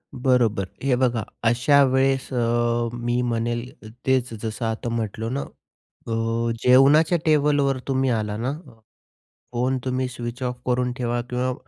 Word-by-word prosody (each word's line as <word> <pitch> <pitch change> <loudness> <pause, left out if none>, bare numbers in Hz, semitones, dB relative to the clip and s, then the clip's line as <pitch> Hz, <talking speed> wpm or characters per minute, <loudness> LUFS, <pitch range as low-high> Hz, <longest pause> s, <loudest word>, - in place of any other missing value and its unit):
बरोबर 120 -6 +1 0.2
हे 135 -2 +2
बघा, 120 -3 +1 0.2
अशा 135 +5 +4
वेळेस 135 0 +1
अ, 120 0 +1
मी 120 +1 -1
म्हणेल 120 0 -3
तेच 130 -3 +1
जसं 110 +1 -3
आता 115 +1 -2
म्हटलो 110 -1 -3
ना, 135 +3 -2 0.4
अ, 115 +1 -2
जेवणाच्या 145 +7 +5
टेबलवर 145 -3 +2
तुम्ही 135 -1 +1
आला 105 -3 -1
ना 125 +5 -2 1.0
फोन, 130 +2 0
तुम्ही 130 0 -1
स्विच 120 0 -6
ऑफ 125 0 -3
करून 125 0 +1
ठेवा 120 -1 -1
किंवा 125 +1 -1
125 Hz, 135 wpm, -23 LUFS, 115-130 Hz, 1.0 s, जेवणाच्या